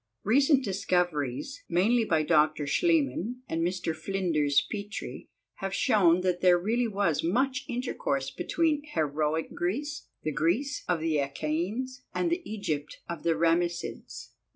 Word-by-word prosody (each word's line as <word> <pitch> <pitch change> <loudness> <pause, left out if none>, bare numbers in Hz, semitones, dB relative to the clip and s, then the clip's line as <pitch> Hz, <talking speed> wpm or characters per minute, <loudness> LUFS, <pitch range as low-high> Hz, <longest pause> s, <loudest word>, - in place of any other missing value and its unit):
Recent 275 +5 +4
discoveries, 180 - -1
mainly 220 +7 +3
by 160 -5 +2
Dr. 155 -1 +3
Schliemann 255 - +1
and 165 - -2
Mr. 175 -1 -1
Flinders 160 -5 +1
Petrie, 205 -1 -6 0.3
have 195 0 -3
shown 185 -8 +4
that 180 -1 0
there 180 -1 +6
really 230 +7 0
was 195 -8 0
much 260 +9 +1
intercourse 140 - -2
between 310 - 0
Heroic 155 - -1
Greece, 285 +12 -3 0.2
the 155 - -1
Greece 175 - 0
of 175 -3 0
the 160 -2 +1
Achaeans, 175 - -2
and 345 - +1
the 345 +2 0
Egypt 165 -9 -3
of 170 -3 -5
the 165 -1 +1
Ramessids. 170 +1 -1
180 Hz, 130 wpm, -28 LUFS, 160-245 Hz, 0.3 s, there